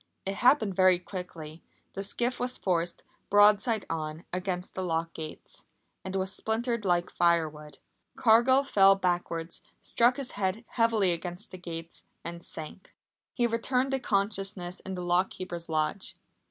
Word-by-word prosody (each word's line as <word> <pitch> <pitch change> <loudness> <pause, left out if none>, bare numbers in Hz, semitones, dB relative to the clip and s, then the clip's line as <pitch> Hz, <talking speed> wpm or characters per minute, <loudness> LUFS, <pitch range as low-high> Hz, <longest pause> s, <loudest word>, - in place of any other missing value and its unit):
It 195 +1 -2
happened 245 -6 +4
very 185 -1 +6
quickly. 170 -3 -8 0.3
The 195 - -4
skiff 240 +5 -2
was 250 +1 -2
forced, 175 -2 -1 0.3
broadside 210 +1 +5
on, 155 0 -4
against 185 0 -3
the 190 - -3
lock 165 -2 -1
gates, 155 -1 -8 0.4
and 190 0 -5
was 190 0 0
splintered 235 +1 -1
like 175 -2 +1
firewood. 155 -3 +1 0.4
Cargill 250 +4 +5
fell 195 -7 +6
backwards, 175 -3 -2 0.2
struck 240 +1 +2
his 275 -3 -4
head 200 +3 -2
heavily 225 -5 +2
against 175 +3 -5
the 185 - -9
gates 165 -1 -7 0.2
and 170 0 -7
sank. 160 +4 -9 0.4
He 240 - +2
returned 250 +3 +1
to 270 - +1
consciousness 195 -4 -1
in 190 - -6
the 180 - -4
lock 175 +2 +3
keeper's 175 -2 -7
lodge. 155 +5 -1
190 Hz, 145 wpm, -29 LUFS, 170-220 Hz, 0.4 s, very